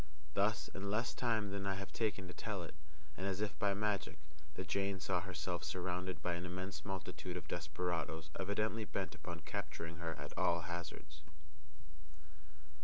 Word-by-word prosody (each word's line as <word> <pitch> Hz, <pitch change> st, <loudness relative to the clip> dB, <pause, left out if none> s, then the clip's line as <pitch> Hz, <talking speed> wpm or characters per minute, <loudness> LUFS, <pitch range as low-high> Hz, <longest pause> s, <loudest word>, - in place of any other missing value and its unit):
Thus, 100 Hz, +3 st, +4 dB
in 100 Hz, +1 st, -2 dB
less 110 Hz, +4 st, +3 dB
time 110 Hz, -4 st, +2 dB
than 100 Hz, 0 st, -1 dB
I 95 Hz, -, +3 dB
have 95 Hz, 0 st, -4 dB
taken 105 Hz, -4 st, +1 dB
to 90 Hz, -, -6 dB
tell 100 Hz, -4 st, -1 dB
it, 85 Hz, -, -6 dB, 0.4 s
and 95 Hz, -, -1 dB
as 95 Hz, -1 st, +1 dB
if 105 Hz, -1 st, 0 dB
by 100 Hz, -2 st, +4 dB
magic, 105 Hz, -5 st, +1 dB, 0.4 s
the 95 Hz, -, -1 dB
Jane 95 Hz, +4 st, +2 dB
saw 90 Hz, -1 st, +2 dB
herself 90 Hz, -1 st, -1 dB
surrounded 90 Hz, 0 st, -1 dB
by 90 Hz, -, +3 dB
an 85 Hz, 0 st, -1 dB
immense 90 Hz, +2 st, -3 dB
multitude 95 Hz, -2 st, -2 dB
of 90 Hz, -, -6 dB
desperadoes 80 Hz, 0 st, 0 dB
evidently 105 Hz, +3 st, +2 dB
bent 95 Hz, -4 st, -1 dB
upon 85 Hz, -1 st, -5 dB
capturing 85 Hz, +1 st, -3 dB
her 85 Hz, -1 st, -1 dB
at -, -, -6 dB
all 85 Hz, 0 st, +4 dB
hazards. 80 Hz, -3 st, -4 dB
95 Hz, 165 wpm, -40 LUFS, 85-100 Hz, 0.4 s, Thus